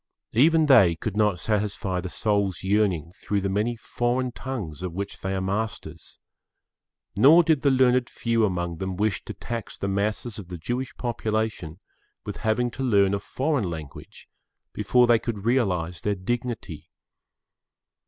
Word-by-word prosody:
Even 160 Hz, +6 st, +5 dB
they 115 Hz, -, +6 dB
could 100 Hz, +5 st, -4 dB
not 105 Hz, -4 st, +2 dB
satisfy 100 Hz, -2 st, -1 dB
the 90 Hz, -, -5 dB
soul's 100 Hz, -2 st, 0 dB
yearning 95 Hz, -5 st, +1 dB
through 100 Hz, +2 st, -2 dB
the 100 Hz, 0 st, -2 dB
many 110 Hz, +4 st, 0 dB
foreign 125 Hz, +2 st, -1 dB
tongues 115 Hz, -, -6 dB
of 90 Hz, -2 st, -5 dB
which 100 Hz, +1 st, -5 dB
they 95 Hz, 0 st, -3 dB
are 95 Hz, -, -1 dB
masters; 100 Hz, +4 st, -4 dB, 1.0 s
nor 150 Hz, -, +7 dB
did[Pg 160 Hz, -1 st, +3 dB
9] -, -, -14 dB
the 140 Hz, -, +2 dB, 0.2 s
learned 125 Hz, 0 st, +2 dB
few 115 Hz, -1 st, 0 dB
among 85 Hz, -4 st, -1 dB
them 95 Hz, +1 st, -3 dB
wish 105 Hz, -1 st, 0 dB
to -, -, -7 dB
tax 115 Hz, -2 st, -6 dB
the 100 Hz, -, -3 dB
masses 105 Hz, +3 st, -2 dB
of 95 Hz, -, -9 dB
the 90 Hz, -1 st, -7 dB
Jewish 120 Hz, +9 st, -4 dB
population 110 Hz, -7 st, -2 dB, 0.5 s
with -, -, -5 dB
having 120 Hz, +2 st, 0 dB
to 135 Hz, +3 st, -5 dB
learn 100 Hz, -6 st, +3 dB
a 100 Hz, -, 0 dB
foreign 130 Hz, -, -1 dB
language 80 Hz, -4 st, -9 dB, 0.5 s
before 125 Hz, -1 st, +3 dB
they 120 Hz, -1 st, +4 dB
could 110 Hz, -4 st, -5 dB
realise 90 Hz, -9 st, 0 dB
their 105 Hz, -1 st, 0 dB
dignity. 95 Hz, -, -4 dB
105 Hz, 160 wpm, -25 LUFS, 95-120 Hz, 1.0 s, nor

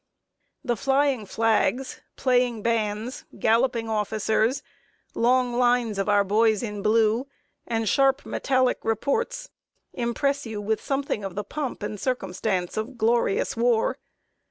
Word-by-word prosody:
The 240 Hz, -4 st, 0 dB
flying 270 Hz, -1 st, +1 dB
flags, 225 Hz, +4 st, 0 dB
playing 245 Hz, -4 st, +1 dB
bands, 225 Hz, +1 st, -1 dB
galloping 230 Hz, +1 st, +2 dB
officers, 220 Hz, +3 st, 0 dB, 0.5 s
long 245 Hz, +1 st, +2 dB
lines 240 Hz, -4 st, +2 dB
of 195 Hz, -, -1 dB
our 205 Hz, -1 st, +4 dB
boys 215 Hz, +2 st, +2 dB
in 210 Hz, -3 st, -4 dB
blue, 220 Hz, +4 st, +2 dB, 0.4 s
and 225 Hz, -1 st, -1 dB
sharp 270 Hz, +4 st, +2 dB
metallic 255 Hz, -2 st, +1 dB
reports, 470 Hz, -, -1 dB, 0.4 s
impress 275 Hz, +4 st, -1 dB
you 220 Hz, -2 st, -5 dB
with 215 Hz, +1 st, -1 dB
something 275 Hz, -6 st, -2 dB
of 195 Hz, -2 st, -5 dB
the 205 Hz, -, -2 dB
pomp 270 Hz, +1 st, -5 dB
and 210 Hz, 0 st, -4 dB
circumstance 190 Hz, -7 st, -2 dB
of 230 Hz, +4 st, -4 dB
glorious 230 Hz, -2 st, +1 dB
war. 235 Hz, -1 st, +1 dB
230 Hz, 125 wpm, -25 LUFS, 215-255 Hz, 0.5 s, our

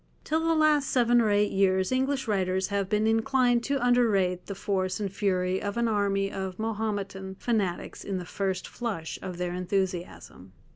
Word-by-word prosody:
Till 315 Hz, -, 0 dB
the 330 Hz, 0 st, +1 dB
last 305 Hz, -3 st, +3 dB
seven 240 Hz, -1 st, +4 dB
or 220 Hz, -, +2 dB
eight 205 Hz, 0 st, +2 dB
years 190 Hz, 0 st, +2 dB
English 265 Hz, 0 st, 0 dB
writers 190 Hz, -2 st, 0 dB
have 200 Hz, -2 st, -1 dB
been 210 Hz, +1 st, +1 dB
inclined 240 Hz, +2 st, +2 dB
to 275 Hz, -3 st, 0 dB
underrate 200 Hz, -8 st, +2 dB
the 200 Hz, -, -5 dB
force 190 Hz, 0 st, -1 dB
and 200 Hz, -2 st, -3 dB
fury 185 Hz, -2 st, 0 dB
of 205 Hz, +2 st, -3 dB
an 235 Hz, 0 st, +2 dB
army 200 Hz, -2 st, +1 dB
of 190 Hz, -1 st, -5 dB
Mahometan 205 Hz, -3 st, -3 dB
fanatics 200 Hz, -5 st, -2 dB
in 195 Hz, -2 st, -3 dB
the 180 Hz, -, -5 dB
first 190 Hz, 0 st, -2 dB
flush 205 Hz, -10 st, -4 dB
of 185 Hz, -2 st, -6 dB
their 180 Hz, 0 st, -2 dB
enthusiasm. 180 Hz, -, -3 dB
200 Hz, 175 wpm, -27 LUFS, 185-235 Hz, -, seven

